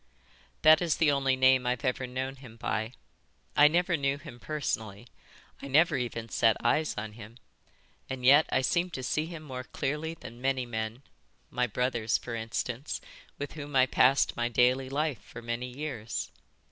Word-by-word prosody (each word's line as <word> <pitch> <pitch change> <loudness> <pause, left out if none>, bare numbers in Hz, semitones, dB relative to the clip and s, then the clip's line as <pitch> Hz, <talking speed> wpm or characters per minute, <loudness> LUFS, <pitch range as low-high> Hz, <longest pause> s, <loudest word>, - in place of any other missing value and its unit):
"That 155 +1 +8
is 170 -3 +1
the 155 -2 +4
only 135 -2 +2
name 130 -1 +4
I've 125 +1 -1
ever 130 0 -1
known 130 +2 -4
him 125 -4 -13
by. 110 +1 -2 0.6
I 150 - +8
never 175 +3 +2
knew 140 -2 0
him 120 -4 -11
personally. 115 -8 -3 0.6
I - - -6
never 155 +5 +4
even 120 -2 -3
set 115 -2 +3
eyes 150 +6 +2
on 105 +1 -4
him. 110 +1 -12 0.7
And 130 -1 -4
yet 145 +4 +7
I 130 - +3
seem 175 +7 +1
to 130 - -5
see 155 +5 -1
him 165 -2 -8
more 130 -4 -6
clearly 150 +6 -3
than 120 -4 -11
many 130 -1 0
men, 110 +2 -4 0.5
my 125 0 +1
brothers, 120 -1 0
for 120 - -7
instance, 115 +4 -3 0.4
with 145 0 -5
whom 145 -2 -7
I 130 -1 +6
passed 130 +1 +3
my 120 0 0
daily 125 +2 +2
life 145 -2 -1
for 115 - -11
many 120 +2 -3
years. 115 - -5
130 Hz, 170 wpm, -29 LUFS, 120-145 Hz, 0.7 s, That